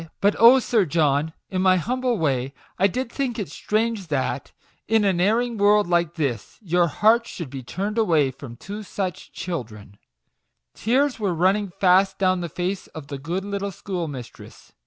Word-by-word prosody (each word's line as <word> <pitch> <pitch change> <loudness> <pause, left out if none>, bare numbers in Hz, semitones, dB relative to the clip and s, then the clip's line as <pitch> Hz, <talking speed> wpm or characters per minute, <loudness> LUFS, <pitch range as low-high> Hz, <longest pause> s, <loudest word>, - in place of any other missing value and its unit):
" - - -52
But 205 +1 +3
oh, 235 +3 +9
Sir 230 -4 +2
John! 150 -1 +1 0.2
in 185 -1 0
my 185 -1 +4
humble 250 +5 -1
way 135 -5 -1 0.2
I 195 - +5
did 250 +5 -3
think 260 -4 -2
it 200 -9 -4
strange 215 +1 -1
that, 135 -4 -2 0.4
in 220 -1 +3
an 185 -3 +2
erring 230 +3 +1
world 205 +1 +4
like 170 -1 +1
this, 135 -10 -3
your 175 -3 +1
heart 225 +8 +3
should 165 -8 -7
be 135 -1 -6
turned 200 - -3 0.4
from 120 -5 -9
two 205 - -7
such 190 -4 -5
children 110 - -7 0.4
\" - - -53 0.3
Tears 260 +3 +1
were 195 -5 0
running 195 +4 +2
fast 190 +1 +4
down 185 -2 +1
the 170 - -4
face 180 +4 -3
of 150 -2 -10
the 140 -2 -5
good 175 +7 -3
little 200 0 -3
schoolmistress. 165 - -7
185 Hz, 175 wpm, -23 LUFS, 160-210 Hz, 0.4 s, oh